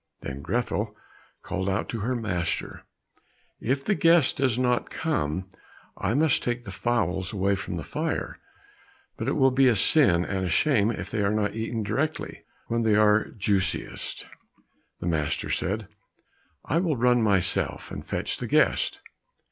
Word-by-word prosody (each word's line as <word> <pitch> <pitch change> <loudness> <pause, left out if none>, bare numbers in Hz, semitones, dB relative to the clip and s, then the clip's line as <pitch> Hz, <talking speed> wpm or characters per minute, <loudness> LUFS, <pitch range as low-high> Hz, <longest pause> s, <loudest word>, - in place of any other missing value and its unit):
Then 70 0 -6
Grethel 105 - -2 0.5
called 95 0 -2
out 95 +2 -1
to 115 - -3
her 120 +5 -1
master, 90 -8 -3 0.7
"If 135 +4 -1
the 210 - +2
guest 165 -6 +4
does 130 -3 +1
not 125 -1 +1
come, 90 - -2 0.5
I 100 +4 -1
must 155 -1 +3
take 120 0 -2
the 100 - -8
fowls 95 -4 -1
away 100 -1 +1
from 95 - -4
the - - -4
fire, - - -3 0.8
but - - -4
it - - +1
will 135 0 +4
be 130 +1 +4
a 120 - +4
sin 95 - +4
and 95 -1 -2
a 90 - -1
shame 110 - +3
if 100 -4 -4
they 110 - -1
are 100 - +2
not 105 -1 0
eaten 115 0 -3
directly, 140 +10 -2 0.2
when 115 0 -1
they 110 -2 +3
are 105 0 +4
juiciest." 100 -2 -2 0.8
The - - -4
master 80 -4 -1
said, 105 +2 -1 0.8
"I 160 - +1
will 165 -6 0
run 120 0 +3
myself, 100 -5 +1
and - - -6
fetch - - -2
the - - -4
guest." - - +2
110 Hz, 160 wpm, -26 LUFS, 95-125 Hz, 0.8 s, guest